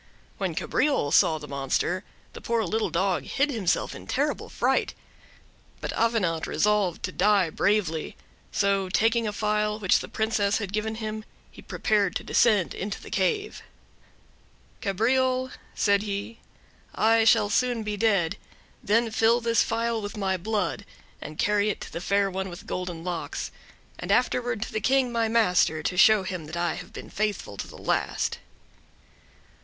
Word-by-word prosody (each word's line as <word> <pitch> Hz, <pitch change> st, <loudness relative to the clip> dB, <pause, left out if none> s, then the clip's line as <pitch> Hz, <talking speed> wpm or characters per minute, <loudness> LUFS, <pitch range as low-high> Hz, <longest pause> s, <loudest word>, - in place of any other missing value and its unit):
When -, -, -2 dB
Cabriole 275 Hz, -, +1 dB
saw 160 Hz, 0 st, +4 dB
the 150 Hz, -1 st, -9 dB
monster, 140 Hz, +7 st, -1 dB, 0.3 s
the -, -, -9 dB
poor 230 Hz, -1 st, 0 dB
little 220 Hz, +4 st, -1 dB
dog 185 Hz, +1 st, 0 dB
hid 285 Hz, +1 st, 0 dB
himself 205 Hz, -9 st, 0 dB
in -, -, -11 dB
terrible -, -, -1 dB
fright. -, -, 0 dB, 0.8 s
But -, -, -4 dB
Avenant 205 Hz, -9 st, +1 dB
resolved 210 Hz, -4 st, +1 dB
to 185 Hz, -, -2 dB
die 195 Hz, -3 st, +3 dB
bravely; 180 Hz, -6 st, 0 dB, 0.3 s
so 195 Hz, -2 st, +1 dB
taking 225 Hz, +3 st, +2 dB
a -, -, -1 dB
phial 210 Hz, 0 st, 0 dB
which 195 Hz, -4 st, +3 dB
the -, -, -6 dB
Princess 220 Hz, -2 st, 0 dB
had 200 Hz, -3 st, -5 dB
given 215 Hz, +1 st, -1 dB
him, 215 Hz, -1 st, -5 dB, 0.3 s
he -, -, -13 dB
prepared 205 Hz, -4 st, 0 dB
to -, -, -2 dB
descend 210 Hz, -7 st, +3 dB
into 200 Hz, +1 st, -4 dB
the -, -, -12 dB
cave. 400 Hz, -, -1 dB, 1.2 s
"Cabriole," 255 Hz, +6 st, +1 dB, 0.2 s
said 200 Hz, -1 st, +3 dB
he, 205 Hz, +2 st, -5 dB, 0.6 s
"I 225 Hz, +1 st, +4 dB
shall 210 Hz, -2 st, +4 dB
soon 245 Hz, 0 st, +1 dB
be 210 Hz, -1 st, -3 dB
dead; 200 Hz, -4 st, +1 dB, 0.5 s
then 225 Hz, +2 st, +2 dB
fill 225 Hz, +2 st, +3 dB
this 230 Hz, -2 st, +2 dB
phial 230 Hz, 0 st, 0 dB
with 205 Hz, 0 st, -6 dB
my 190 Hz, -2 st, 0 dB
blood, 205 Hz, +2 st, -2 dB, 0.4 s
and 150 Hz, -, -8 dB
carry 210 Hz, 0 st, +2 dB
it 210 Hz, -, -2 dB
to -, -, -8 dB
the 170 Hz, -, -4 dB
Fair 200 Hz, +1 st, +1 dB
One 190 Hz, +1 st, -3 dB
with 175 Hz, -, -10 dB
Golden 180 Hz, -2 st, -4 dB
Locks, 175 Hz, -2 st, -4 dB, 0.5 s
and -, -, -3 dB
afterward 245 Hz, -3 st, +1 dB
to -, -, -8 dB
the 215 Hz, -, -1 dB
King, 260 Hz, +2 st, +2 dB
my 230 Hz, -1 st, +1 dB
master, 180 Hz, -8 st, +2 dB
to 180 Hz, -, -1 dB
show 210 Hz, +2 st, +6 dB
him 180 Hz, -5 st, -5 dB
I 170 Hz, -1 st, 0 dB
have 180 Hz, -, -9 dB
been -, -, -9 dB
faithful 205 Hz, -, -2 dB
to -, -, -5 dB
the -, -, -12 dB
last." -, -, -1 dB
210 Hz, 160 wpm, -26 LUFS, 185-225 Hz, 1.2 s, show